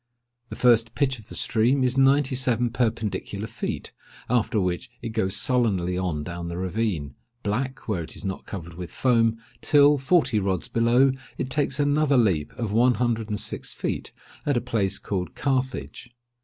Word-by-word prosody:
The -, -, -6 dB
first 115 Hz, -2 st, +3 dB
pitch 135 Hz, -3 st, 0 dB
of 110 Hz, +1 st, -14 dB
the -, -, -5 dB
stream 125 Hz, +5 st, +2 dB
is 130 Hz, 0 st, +1 dB
ninety 135 Hz, +1 st, +4 dB
seven 125 Hz, -2 st, +1 dB
perpendicular 115 Hz, -3 st, -2 dB
feet; -, -, -5 dB, 0.4 s
after 115 Hz, -2 st, +2 dB
which 90 Hz, +1 st, -2 dB
it -, -, -3 dB
goes 110 Hz, -4 st, 0 dB
sullenly 100 Hz, -7 st, +1 dB
on 90 Hz, -5 st, -2 dB
down 85 Hz, +1 st, -5 dB
the 85 Hz, 0 st, -5 dB
ravine—black, 105 Hz, -, -3 dB
where 100 Hz, -6 st, -1 dB
it 80 Hz, -, -8 dB
is -, -, -7 dB
not 95 Hz, 0 st, -4 dB
covered 85 Hz, -4 st, -7 dB
with 90 Hz, 0 st, -7 dB
foam—till, 125 Hz, +4 st, +3 dB
forty 135 Hz, -5 st, +2 dB
rods 95 Hz, -3 st, -1 dB
below, 120 Hz, +4 st, +3 dB, 0.3 s
it 130 Hz, 0 st, -3 dB
takes 140 Hz, 0 st, 0 dB
another 145 Hz, -1 st, +3 dB
leap 95 Hz, -11 st, +2 dB
of 115 Hz, -4 st, -3 dB
one 120 Hz, +3 st, +4 dB
hundred 115 Hz, -3 st, -1 dB
and 105 Hz, -1 st, -1 dB
six -, -, -3 dB
feet, -, -, -3 dB, 0.3 s
at 145 Hz, -3 st, +1 dB
a -, -, +4 dB
place 115 Hz, -5 st, 0 dB
called 90 Hz, -3 st, -4 dB
Carthage. 130 Hz, -2 st, -2 dB
115 Hz, 165 wpm, -25 LUFS, 95-130 Hz, 0.4 s, ninety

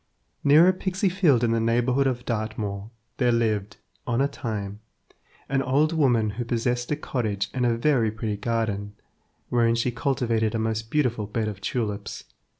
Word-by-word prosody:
Near 150 Hz, +5 st, +7 dB
a 185 Hz, -, +5 dB
pixy 190 Hz, +1 st, -1 dB
field 160 Hz, -, +3 dB
in 115 Hz, -, +2 dB
the 115 Hz, -, +2 dB
neighbourhood 120 Hz, +4 st, +2 dB
of 125 Hz, -2 st, -2 dB
Dartmoor, 105 Hz, -3 st, -3 dB, 0.3 s
there 125 Hz, -2 st, +3 dB
lived, 110 Hz, -3 st, 0 dB, 0.3 s
on 120 Hz, -1 st, +1 dB
a 140 Hz, -, +3 dB
time, 105 Hz, -6 st, -5 dB, 0.7 s
an 135 Hz, 0 st, +1 dB
old 145 Hz, +5 st, +2 dB
woman 120 Hz, -9 st, +2 dB
who 115 Hz, +4 st, -4 dB
possessed 120 Hz, +1 st, -1 dB
a 150 Hz, -, +1 dB
cottage 110 Hz, -9 st, -2 dB
and 125 Hz, -1 st, +1 dB
a 115 Hz, -1 st, +1 dB
very 120 Hz, -3 st, +2 dB
pretty 105 Hz, -1 st, -3 dB
garden, 105 Hz, -2 st, -2 dB, 0.5 s
wherein 115 Hz, -1 st, +3 dB
she 120 Hz, +1 st, 0 dB
cultivated 115 Hz, -3 st, 0 dB
a -, -, +2 dB
most 110 Hz, 0 st, -2 dB
beautiful 120 Hz, -7 st, 0 dB
bed 110 Hz, +1 st, -2 dB
of 100 Hz, -2 st, -5 dB
tulips. 105 Hz, -2 st, -3 dB
115 Hz, 165 wpm, -25 LUFS, 110-130 Hz, 0.7 s, Near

